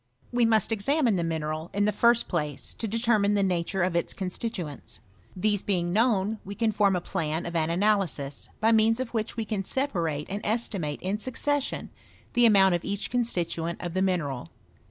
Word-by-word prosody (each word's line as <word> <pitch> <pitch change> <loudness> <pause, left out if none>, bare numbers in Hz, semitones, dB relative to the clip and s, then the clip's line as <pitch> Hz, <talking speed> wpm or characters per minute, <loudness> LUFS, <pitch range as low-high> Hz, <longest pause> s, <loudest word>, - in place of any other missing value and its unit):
We 245 -1 +3
must 220 -1 +2
€xamine 235 +2 +2
the 175 - 0
mineral, 160 0 -3
in 205 0 +2
the 210 - +3
first 235 +3 +3
place, 150 -6 -2
to 225 - -4
determine 215 -2 +2
the 200 - +2
nature 185 0 0
of 180 -1 0
its 170 - -1
constituents. 185 - -5 0.4
These 205 +1 +1
being 175 -3 0
known, 215 -1 +2
we 200 +2 -7
can 225 0 +1
form 200 -2 +3
a - - +1
plan 160 -1 -2
of 170 - -5
an 160 -1 +1
analysis, 175 -7 0
by 225 +1 +3
means 225 +1 +4
of 260 -2 -2
which 225 0 -3
we 225 - -1
can 210 -3 -2
separate 170 - -1
and 200 +2 -4
estimate 200 -9 -2
in 195 +3 -1
succession 280 +4 -2 0.4
the 240 -1 +6
amount 195 -3 +5
of 175 - -1
each 200 0 -3
constituent 170 -8 -1
of 175 -2 -5
the 185 - 0
mineral. 145 - -1
200 Hz, 185 wpm, -27 LUFS, 170-225 Hz, 0.4 s, the